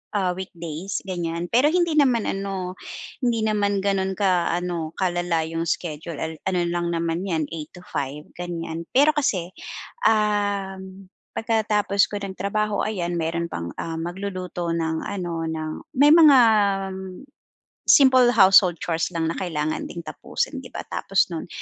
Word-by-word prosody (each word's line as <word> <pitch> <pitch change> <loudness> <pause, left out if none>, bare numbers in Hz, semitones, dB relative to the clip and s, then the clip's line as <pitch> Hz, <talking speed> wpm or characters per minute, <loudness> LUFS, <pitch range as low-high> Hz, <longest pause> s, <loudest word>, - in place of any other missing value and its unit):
ah, 185 -3 +1
weekdays 175 -1 -5
ganiyan, 170 -2 -3
pero 255 +6 +5
hindi 345 0 +2
naman 255 -6 +3
ano, 195 -2 -3 0.5
hindi 240 -3 +1
naman 205 -2 +1
gano'n 190 -1 0
ka 185 -5 +2
ano, 170 -3 -3
kalala 175 -3 0
'yong 165 +1 -3
schedule, 160 -1 -3
al 160 0 -3 0.2
ano 180 -2 0
lang 175 0 -1
naman 165 +2 -1
'yan 165 -4 0
8 155 -1 -6
to 180 - -11
5 140 +2 -4
ganiyan, 170 -1 -5
pero 290 +4 +6
kasi, 190 - 0 0.6
um, 200 -3 -1 0.3
pagkatapos 215 -3 +2
ko 205 - -5
ng 195 -1 -4
trabaho, 210 +2 -1
ayan, 175 -5 -2
meron 170 +1 -1
pang 85 0 -4
ah, 165 -1 -4
magluluto 180 0 -4
ng 160 -1 -1
ano 175 -4 -3
ng 155 -1 -3 0.3
may 290 +1 +7
mga, 305 -5 +8 0.6
um, 190 +3 -8 0.6
simple 260 -3 +7
household 190 -3 +7
chores 165 -1 0
lang 165 0 0
na - - -5
kailangan 155 -4 -2
ding 170 - -7
tapusin 160 - -3
'di - - -10
ba, - - -4
tapos 195 -1 +1
nun 165 - -5
185 Hz, 150 wpm, -23 LUFS, 165-205 Hz, 0.6 s, mga